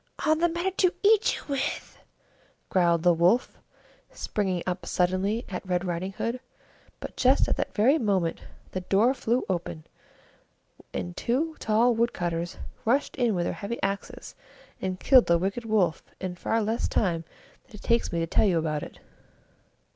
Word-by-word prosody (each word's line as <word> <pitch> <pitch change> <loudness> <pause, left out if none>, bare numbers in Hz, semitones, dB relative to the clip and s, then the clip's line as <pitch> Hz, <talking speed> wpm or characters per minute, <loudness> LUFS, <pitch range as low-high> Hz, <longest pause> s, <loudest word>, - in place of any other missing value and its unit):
"All 310 - +4
the 345 +2 +2
better 345 +3 -1
to 365 -2 +3
eat 420 +1 +4
you - - -8
with!" 275 -2 -3 0.7
growled 170 -3 +2
the 175 -1 +5
Wolf, 175 +9 +2 0.5
springing 190 -4 -2
up 180 0 -3
suddenly 185 +6 0
at 185 - -5
Red 180 0 -1
Riding 180 +2 -3
Hood. 230 +5 -3 0.6
But - - -8
just 260 +1 +3
at - - +1
that - - -3
very 265 +9 +4
moment 190 -7 0 0.3
the 185 - -3
door 200 +7 +3
flew 245 -1 0
open, 170 -4 -3 1.1
and 90 -1 -4
two 310 +7 -1
tall 225 +3 +3
wood 235 +1 +1
cutters 170 0 -3 0.3
rushed 265 +6 +1
in 240 -5 +2
with 175 - 0
their - - -1
heavy 230 +4 -5
axes, 195 0 -4 0.5
and 185 -1 -3
killed 255 -3 +6
the 170 - +4
wicked 195 +7 -2
Wolf 200 -7 +1 0.2
in 185 -1 -4
far 220 +5 -1
less 225 +3 -1
time 170 -5 0 0.4
than - - -14
it 210 - -12
takes 235 0 +1
me 170 - -2
to - - +1
tell 165 - +2
you 180 -3 +2
about 155 -2 -1
it. - - -9
195 Hz, 170 wpm, -27 LUFS, 175-240 Hz, 1.1 s, killed